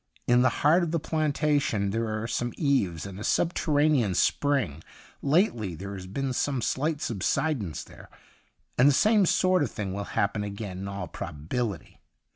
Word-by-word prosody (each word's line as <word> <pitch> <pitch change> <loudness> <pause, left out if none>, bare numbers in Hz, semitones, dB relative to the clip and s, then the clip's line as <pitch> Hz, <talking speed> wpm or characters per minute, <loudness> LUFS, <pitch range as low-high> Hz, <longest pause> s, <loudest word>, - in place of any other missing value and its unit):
In 125 0 +4
the 130 - +5 0.2
heart 165 +5 +6
of 170 - -1
the 165 +1 0
plantation 145 -9 0
there 115 +1 -1
are 110 +1 -3
some 120 0 -2
eaves 105 - +1
and 100 -1 -8
a - - -6
subterranean 145 - +2
spring; 115 - +1 0.4
lately 135 - +1
there 100 +4 -7
has 95 -2 -7
been 135 +7 -2
some 135 +1 0
slight 150 +5 -1
subsidence 110 - -1
there, - - -15 0.7
and 130 - +7
the - - +4
same 210 - +4
sort 185 +1 +3
of 145 - 0
thing 100 -4 -4
will 100 +1 -4
happen 100 +1 -1
again 100 -2 -6
in 100 - -5
all 100 0 -5
probabilit}'. 85 +6 -4
120 Hz, 165 wpm, -27 LUFS, 100-150 Hz, 0.7 s, and